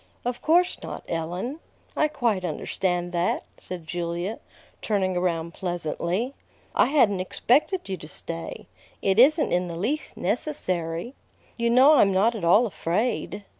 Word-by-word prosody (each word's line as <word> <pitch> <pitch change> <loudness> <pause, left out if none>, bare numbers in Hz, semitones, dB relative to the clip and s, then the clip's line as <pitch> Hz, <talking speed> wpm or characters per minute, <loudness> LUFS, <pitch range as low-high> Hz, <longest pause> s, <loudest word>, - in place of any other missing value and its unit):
"Of 245 0 -2
course 355 +3 +3
not, - - -7
Ellen. 175 - -3 0.4
I 305 - +3
quite 235 -10 0
understand 175 +1 -2
that," 175 0 0 0.2
said 175 -3 -7
Julia, 175 +5 -3 0.4
turning 190 -3 0
around 170 -2 -1
pleasantly. 175 - -2 0.4
"I - - +4
hadn't 240 -9 +3
expected 280 - +1
you 190 -1 -3
to 155 - -10
stay. 85 - -5 0.4
It 195 +2 +3
isn't 300 +5 +5
in 180 0 +1
the 170 - -5
least 275 - -2
necessary. 185 - -2 0.4
You 235 0 0
know 260 +5 +7
I'm 205 -9 +5
not 200 +5 +3
at 215 -6 -6
all 195 +8 +5
afraid." 200 +3 -2
190 Hz, 140 wpm, -25 LUFS, 175-245 Hz, 0.4 s, know